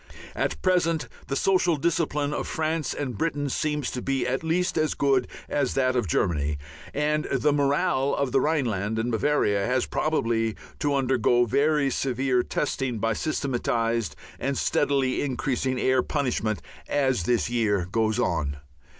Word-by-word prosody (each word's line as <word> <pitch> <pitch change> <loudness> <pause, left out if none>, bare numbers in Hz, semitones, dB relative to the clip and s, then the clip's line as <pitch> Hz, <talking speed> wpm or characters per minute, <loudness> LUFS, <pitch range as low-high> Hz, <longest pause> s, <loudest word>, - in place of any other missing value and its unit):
At - - -1
present 170 -4 +2 0.2
the 135 - -2
social 180 +1 +3
discipline 150 -2 0
of - - -3
France 155 -2 -1
and 130 -5 -3
Britain 145 0 -1
seems 150 -1 -1
to 125 - -4
be 135 0 0
at 130 +4 -1
least 180 +3 0
as 155 -1 +1
good 135 -3 +2 0.2
as 140 -3 0
that 130 -1 +2
of 120 -5 +1
Germany, 75 -3 0 0.3
and 150 +1 0
the 145 +2 +1
morale 140 -1 +1
of 140 -2 -1
the 135 0 +3
Rhineland 115 -9 0
and 115 +2 -1
Bavaria 110 -4 +2
has 125 +3 +1
probably 115 -8 0 0.2
to 145 -1 +1
undergo 125 -2 +3
very 140 +3 +2
severe 130 0 +1
testing 130 -2 -2
by 115 +1 0
systematized 115 -5 -1 0.2
and 135 0 -1
steadily 135 -2 +1
increasing 130 -1 -1
air 130 0 +3
punishment 120 -8 -1 0.2
as 130 -7 +1
this 120 -2 +2
year 105 -6 +1
goes 110 0 +1
on. 75 -4 0
135 Hz, 150 wpm, -26 LUFS, 120-150 Hz, 0.3 s, social